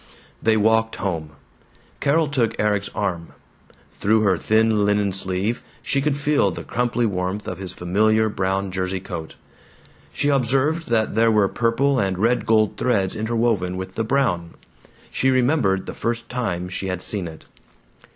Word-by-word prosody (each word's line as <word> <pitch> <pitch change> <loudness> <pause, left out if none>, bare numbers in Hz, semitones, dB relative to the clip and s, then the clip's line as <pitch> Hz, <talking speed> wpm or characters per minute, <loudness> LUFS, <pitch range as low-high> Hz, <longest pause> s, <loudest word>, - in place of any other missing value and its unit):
They 110 0 +3
walked 110 +1 +2
home. 80 -6 -3 0.7
Carol 155 +3 +2
took 120 -5 -1
Erik's 105 -1 +1
arm. 90 -6 -3 0.7
Through 110 +2 +3
her 95 -5 +2
thin 110 -1 +2
linen 105 -1 +1
sleeve 95 +4 -2 0.2
she 140 +4 0
could 145 0 0
feel 145 -8 +2
the 85 - -6
crumply 120 0 0
warmth 95 0 -2
of 95 - -5
his 95 -3 -6
familiar 110 +5 +2
brown 95 -1 -1
jersey 95 0 -2
coat. 80 -3 -7 0.8
She 145 - 0
observed 140 +4 +1
that 110 -2 +1
there 115 +2 +4
were 105 -3 +4
purple 125 +6 +1
and 95 -2 0
red 115 +5 +1
gold 110 -2 +3
threads 100 -5 +1
interwoven 110 -5 0
with 95 0 -6
the 115 - -1
brown. 110 -9 0 0.6
She 130 - +1
remembered 125 -7 +2
the - - -6
first 115 0 -3
time 95 -8 -2
she 95 +1 -4
had 90 -1 -3
seen 100 -5 -2
it. 80 -1 -11
110 Hz, 155 wpm, -22 LUFS, 95-120 Hz, 0.8 s, there